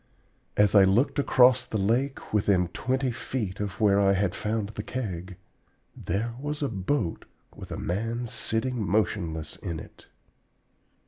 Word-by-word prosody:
As 105 Hz, -1 st, +4 dB
I 100 Hz, -2 st, +8 dB
looked 110 Hz, +10 st, +3 dB
across 130 Hz, -2 st, +5 dB
the 110 Hz, -, -2 dB
lake, 120 Hz, +8 st, -1 dB
within 95 Hz, -4 st, +2 dB
twenty 130 Hz, +6 st, -1 dB
feet 110 Hz, -5 st, -4 dB
of 100 Hz, -1 st, -4 dB
where 100 Hz, -2 st, +4 dB
I 100 Hz, -1 st, +4 dB
had 95 Hz, -2 st, +1 dB
found 105 Hz, -1 st, -2 dB
the 105 Hz, -, -5 dB
Keg, 95 Hz, -7 st, -5 dB, 0.6 s
there 115 Hz, +4 st, -2 dB
was 145 Hz, +1 st, -3 dB
a 140 Hz, -, 0 dB
boat 100 Hz, -, -2 dB, 0.3 s
with -, -, -10 dB
a -, -, -3 dB
man 115 Hz, +7 st, -2 dB
sitting 115 Hz, +1 st, -1 dB
motionless 85 Hz, -5 st, -1 dB
in 85 Hz, -5 st, -5 dB
it! -, -, -13 dB
105 Hz, 145 wpm, -27 LUFS, 95-125 Hz, 0.6 s, I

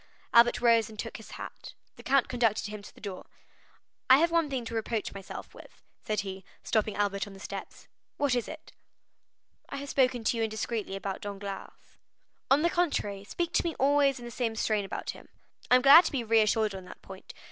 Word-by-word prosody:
Albert 235 Hz, +1 st, +6 dB
rose 230 Hz, -2 st, +4 dB
and 215 Hz, -, -12 dB
took -, -, -5 dB
his -, -, -12 dB
hat; -, -, -9 dB, 0.2 s
the -, -, -13 dB
count 275 Hz, -1 st, +2 dB
conducted 230 Hz, -4 st, +1 dB
him 210 Hz, -1 st, -6 dB
to 200 Hz, -, -12 dB
the -, -, -16 dB
door. 195 Hz, -3 st, -7 dB, 0.8 s
"I 260 Hz, -, +9 dB
have 335 Hz, +3 st, +3 dB
one 335 Hz, -3 st, +2 dB
thing 260 Hz, -4 st, -3 dB
to 230 Hz, -, -6 dB
reproach 225 Hz, -1 st, -2 dB
myself 195 Hz, -1 st, -9 dB
with," -, -, -15 dB, 0.2 s
said 215 Hz, -1 st, -1 dB
he, 190 Hz, -1 st, -7 dB, 0.2 s
stopping 215 Hz, -2 st, 0 dB
Albert 200 Hz, 0 st, -1 dB
on 200 Hz, -, -11 dB
the 195 Hz, -, -12 dB
steps. -, -, -8 dB, 0.3 s
"What 285 Hz, -3 st, +1 dB
is 245 Hz, -2 st, 0 dB
it?" 315 Hz, +1 st, -10 dB, 1.0 s
"I -, -, -5 dB
have 280 Hz, 0 st, -6 dB
spoken 255 Hz, -3 st, +2 dB
to 230 Hz, -, +1 dB
you -, -, -1 dB
indiscreetly 220 Hz, -2 st, -3 dB
about 195 Hz, 0 st, -4 dB
Danglars." 200 Hz, -1 st, -8 dB, 0.5 s
"On 280 Hz, +3 st, +4 dB
the 340 Hz, -, +4 dB
contrary, 210 Hz, -, -1 dB
speak 345 Hz, +11 st, -3 dB
to -, -, +2 dB
me 335 Hz, -2 st, -2 dB
always 280 Hz, 0 st, +3 dB
in 240 Hz, -, -9 dB
the 240 Hz, -, -7 dB
same 230 Hz, -2 st, -2 dB
strain 215 Hz, -2 st, 0 dB
about -, -, -4 dB
him." -, -, -15 dB, 0.4 s
"I 250 Hz, -, +7 dB
am 250 Hz, -, +4 dB
glad 285 Hz, +6 st, +9 dB
to -, -, -1 dB
be 265 Hz, -4 st, -1 dB
reassured 220 Hz, -1 st, +2 dB
on 190 Hz, -1 st, -8 dB
that -, -, -13 dB
point. 190 Hz, 0 st, -11 dB
225 Hz, 210 wpm, -29 LUFS, 205-270 Hz, 1.0 s, I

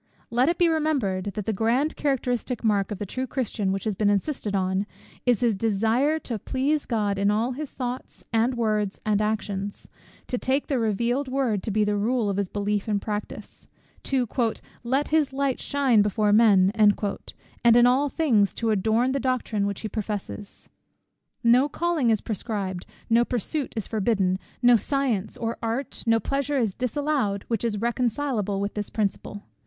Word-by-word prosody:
Let 250 Hz, +5 st, +3 dB
it 345 Hz, -, 0 dB
be 350 Hz, -, +4 dB
remembered, 290 Hz, -, 0 dB
that 205 Hz, 0 st, -4 dB
the 220 Hz, -, 0 dB
grand 235 Hz, +9 st, +1 dB
characteristic 250 Hz, -4 st, -1 dB
mark 205 Hz, -3 st, +2 dB
of 210 Hz, -, -4 dB
the 205 Hz, -, -4 dB
true 255 Hz, +7 st, -4 dB
Christian, 225 Hz, -6 st, -2 dB
which 195 Hz, 0 st, -2 dB
has 215 Hz, -, -1 dB
been 205 Hz, +1 st, +1 dB
insisted 205 Hz, 0 st, -1 dB
on, 190 Hz, +1 st, 0 dB, 0.4 s
is 245 Hz, -1 st, +3 dB
_his 230 Hz, -3 st, +3 dB
desiring 225 Hz, +9 st, +1 dB
to 230 Hz, -4 st, -4 dB
please 280 Hz, +7 st, -1 dB
God 205 Hz, -4 st, 0 dB
in 200 Hz, 0 st, +3 dB
all 220 Hz, +4 st, +1 dB
his 285 Hz, +2 st, -6 dB
thoughts, 250 Hz, 0 st, -6 dB
and 235 Hz, +3 st, +2 dB
words, 215 Hz, -3 st, 0 dB
and 210 Hz, -1 st, +2 dB
actions; 205 Hz, -2 st, -3 dB, 0.4 s
to 250 Hz, -, -3 dB
take 270 Hz, +2 st, 0 dB
the 270 Hz, -4 st, 0 dB
revealed 235 Hz, +5 st, 0 dB
word 255 Hz, -6 st, 0 dB
to -, -, -4 dB
be 215 Hz, +1 st, +2 dB
the 210 Hz, 0 st, +1 dB
rule 220 Hz, +1 st, +1 dB
of 195 Hz, -, -3 dB
his 200 Hz, -2 st, -1 dB
belief 205 Hz, 0 st, -1 dB
and 205 Hz, -2 st, +1 dB
practice; 210 Hz, 0 st, -6 dB, 0.4 s
to 260 Hz, -3 st, +1 dB, 0.6 s
"let 265 Hz, +4 st, 0 dB
his 305 Hz, -3 st, +2 dB
light 275 Hz, -1 st, 0 dB
shine 270 Hz, -6 st, +3 dB
before 205 Hz, 0 st, +2 dB
men;" 200 Hz, -4 st, +5 dB
and 210 Hz, -2 st, +5 dB, 0.8 s
in 240 Hz, 0 st, +7 dB
all 265 Hz, +4 st, +3 dB
things 235 Hz, -, +2 dB
to 230 Hz, -1 st, 0 dB
adorn 220 Hz, +5 st, +2 dB
the 275 Hz, -, 0 dB
doctrine 240 Hz, -6 st, 0 dB
which 200 Hz, -1 st, -4 dB
he 220 Hz, -, -3 dB
professes_. 210 Hz, -1 st, -6 dB, 0.8 s
No 245 Hz, +5 st, +5 dB
calling 330 Hz, -6 st, 0 dB
is 220 Hz, -2 st, +2 dB
proscribed, 200 Hz, -4 st, -4 dB, 0.2 s
no 230 Hz, +1 st, +4 dB
pursuit 250 Hz, +5 st, -2 dB
is 220 Hz, -, -1 dB
forbidden, 195 Hz, -4 st, 0 dB, 0.2 s
no 245 Hz, -1 st, +7 dB
science 240 Hz, -5 st, -1 dB
or 230 Hz, 0 st, -3 dB
art, 230 Hz, +4 st, -3 dB
no 225 Hz, 0 st, +4 dB
pleasure 280 Hz, +3 st, -1 dB
is 225 Hz, -7 st, +1 dB
disallowed, 250 Hz, -5 st, -1 dB
which 230 Hz, -2 st, -1 dB
is 225 Hz, -3 st, 0 dB
reconcilable 235 Hz, -3 st, -1 dB
with 200 Hz, +1 st, -2 dB
this 210 Hz, -1 st, -4 dB
principle. 205 Hz, -1 st, -3 dB
225 Hz, 175 wpm, -25 LUFS, 205-260 Hz, 0.8 s, in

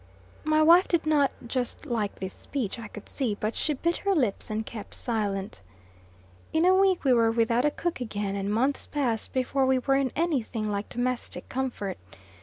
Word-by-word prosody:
My 310 Hz, 0 st, +3 dB
wife 345 Hz, +4 st, +7 dB
did 340 Hz, -3 st, +1 dB
not 290 Hz, -3 st, +3 dB
just 250 Hz, +4 st, -3 dB
like 225 Hz, -7 st, -1 dB
this 190 Hz, -1 st, -6 dB
speech, 245 Hz, -6 st, -4 dB
I 230 Hz, -, -6 dB
could 210 Hz, 0 st, -11 dB
see, 245 Hz, -7 st, -1 dB
but 215 Hz, +2 st, -1 dB
she 300 Hz, -, -1 dB
bit 340 Hz, +5 st, 0 dB
her 400 Hz, -1 st, +1 dB
lips 240 Hz, -, 0 dB
and 215 Hz, +1 st, -2 dB
kept 215 Hz, -2 st, -8 dB
silent. 200 Hz, -, -2 dB, 0.9 s
In 320 Hz, +2 st, +3 dB
a 370 Hz, -, +6 dB
week 380 Hz, -1 st, +3 dB
we 265 Hz, -3 st, +4 dB
were 230 Hz, -2 st, +4 dB
without 230 Hz, +2 st, +2 dB
a -, -, +5 dB
cook 335 Hz, -1 st, -3 dB
again; 205 Hz, -4 st, -2 dB
and 200 Hz, 0 st, -2 dB
months 260 Hz, +6 st, 0 dB
passed 245 Hz, -7 st, -1 dB
before 260 Hz, +1 st, +1 dB
we 260 Hz, 0 st, +4 dB
were 270 Hz, +2 st, +2 dB
in 270 Hz, -2 st, +1 dB
any 325 Hz, -5 st, +1 dB
thing 220 Hz, -2 st, -3 dB
like 200 Hz, 0 st, -3 dB
domestic 250 Hz, 0 st, -3 dB
comfort. 250 Hz, -, -3 dB
250 Hz, 195 wpm, -27 LUFS, 215-295 Hz, 0.9 s, wife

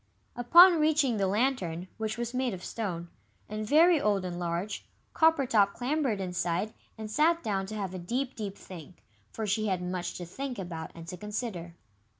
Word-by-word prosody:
Upon 340 Hz, +9 st, +7 dB
reaching 300 Hz, -6 st, +2 dB
the 195 Hz, -1 st, +1 dB
Lantern, 190 Hz, -6 st, 0 dB
which 220 Hz, 0 st, -3 dB
was 240 Hz, 0 st, -3 dB
made 250 Hz, -4 st, -1 dB
of 180 Hz, -, -11 dB
stone, 175 Hz, -6 st, -4 dB, 0.4 s
and 215 Hz, 0 st, -4 dB
very 325 Hz, +3 st, +5 dB
old 200 Hz, -3 st, +1 dB
and 175 Hz, -1 st, -4 dB
large, 175 Hz, +4 st, -3 dB, 0.3 s
Coppertop 265 Hz, -11 st, +3 dB
clambered 255 Hz, -3 st, -1 dB
inside, 180 Hz, +2 st, -2 dB, 0.2 s
and 215 Hz, -1 st, -6 dB
sat 330 Hz, +6 st, +3 dB
down 195 Hz, -3 st, -1 dB
to 215 Hz, -, -6 dB
have 195 Hz, -3 st, -4 dB
a 185 Hz, -, -5 dB
deep, 250 Hz, +9 st, -3 dB
deep 205 Hz, -3 st, -5 dB
think, 180 Hz, -1 st, -12 dB, 0.3 s
for 220 Hz, -, -4 dB
she 215 Hz, +1 st, 0 dB
had 190 Hz, -3 st, 0 dB
much 180 Hz, 0 st, -3 dB
to 175 Hz, -, -6 dB
think 255 Hz, +8 st, -5 dB
about 170 Hz, -4 st, -6 dB
and 165 Hz, 0 st, -10 dB
to 180 Hz, +1 st, -6 dB
consider. 205 Hz, -4 st, -5 dB
210 Hz, 175 wpm, -29 LUFS, 180-255 Hz, 0.4 s, Upon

